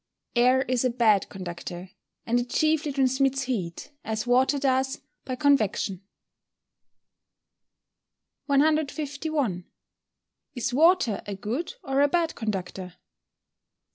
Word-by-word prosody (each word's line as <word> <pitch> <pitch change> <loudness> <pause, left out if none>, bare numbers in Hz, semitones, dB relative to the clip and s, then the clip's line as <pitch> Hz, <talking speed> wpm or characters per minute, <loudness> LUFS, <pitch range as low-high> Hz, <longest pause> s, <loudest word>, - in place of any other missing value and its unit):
_ - - -59 0.4
Air 255 +2 +4
is 255 -2 0
a 255 - +2
bad 225 -5 +2
conductor, 180 -1 -7 0.3
and 240 +1 +2
it 245 0 -4
chiefly 310 +1 +1
transmits 270 0 +1
heat, 205 - -4
as 220 0 -3
water 255 +3 +3
does, 265 -1 0 0.3
by 255 - -3
convection. 220 -9 +1 2.5
151. 285 - 0 0.9
_Is 245 0 -2
water 320 - +3
a 200 - -4
good 245 - -4
or 270 +1 +1
a 285 - +5
bad 330 +1 0
conductor? 190 -4 -4
255 Hz, 110 wpm, -26 LUFS, 215-285 Hz, 2.5 s, a